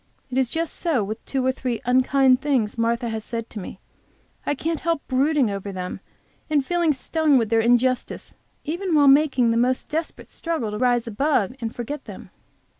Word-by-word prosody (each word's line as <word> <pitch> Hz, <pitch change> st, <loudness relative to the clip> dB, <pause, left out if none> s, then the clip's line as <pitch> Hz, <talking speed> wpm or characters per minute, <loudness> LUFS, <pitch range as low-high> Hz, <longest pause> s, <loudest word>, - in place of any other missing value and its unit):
It 255 Hz, -, -2 dB
is 260 Hz, -3 st, +1 dB
just 325 Hz, +2 st, -2 dB
so 310 Hz, -, 0 dB
with 215 Hz, +3 st, -6 dB
two 265 Hz, -2 st, -1 dB
or 260 Hz, -, +3 dB
three 250 Hz, -3 st, -3 dB
unkind 255 Hz, +1 st, +4 dB
things 255 Hz, -8 st, 0 dB
Martha 235 Hz, +1 st, 0 dB
has 220 Hz, -1 st, -4 dB
said 230 Hz, 0 st, -5 dB
to 215 Hz, -, -6 dB
me. 185 Hz, -, -8 dB, 0.7 s
I 290 Hz, -, +1 dB
can't 320 Hz, +2 st, -2 dB
help 335 Hz, -3 st, -2 dB
brooding 270 Hz, -2 st, +2 dB
over 200 Hz, 0 st, -5 dB
them 180 Hz, -1 st, -5 dB, 0.5 s
and 290 Hz, -3 st, +2 dB
feeling 345 Hz, -1 st, +2 dB
stung 300 Hz, +1 st, +2 dB
with 225 Hz, -3 st, 0 dB
their 225 Hz, 0 st, +4 dB
injustice, 245 Hz, +2 st, +1 dB, 0.3 s
even 345 Hz, +3 st, -2 dB
while 290 Hz, -2 st, +5 dB
making 270 Hz, -4 st, +4 dB
the 230 Hz, -, +1 dB
most 250 Hz, +2 st, 0 dB
desperate 320 Hz, +2 st, -4 dB
struggle 320 Hz, -11 st, -3 dB
to 210 Hz, -, -4 dB
rise 245 Hz, -2 st, +2 dB
above 240 Hz, -1 st, 0 dB
and 230 Hz, 0 st, -4 dB
forget 265 Hz, +5 st, -5 dB
them. -, -, -10 dB
255 Hz, 190 wpm, -23 LUFS, 230-295 Hz, 0.7 s, while